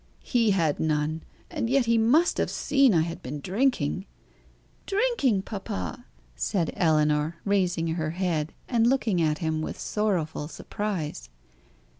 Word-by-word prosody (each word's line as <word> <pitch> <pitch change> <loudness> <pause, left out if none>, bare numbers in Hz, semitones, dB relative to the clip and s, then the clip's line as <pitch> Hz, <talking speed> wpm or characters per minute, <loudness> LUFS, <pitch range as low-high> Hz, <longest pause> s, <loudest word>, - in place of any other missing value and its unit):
He 235 -4 +2
had 165 -7 +1
none, 155 0 0 0.3
and 230 - -2
yet 270 -1 +3
he 230 0 +3
must 255 +10 +3
have - - +1
seen 275 -3 +3
I 165 -5 +4
had 170 +1 -4
been 145 +4 -5
drinking." 190 - 0 0.8
"Drinking, 390 - +1
papa!" 95 - -5 0.3
said 170 - -1
Ellinor, 155 -1 +2
raising 185 -4 +1
her 160 -1 -1
head, 165 -3 -1 0.2
and 235 -2 +3
looking 230 -8 +2
at 155 -1 +1
him 155 0 0
with - - -4
sorrowful 175 -8 -1
surprise. 165 - -4
180 Hz, 135 wpm, -26 LUFS, 155-225 Hz, 0.8 s, I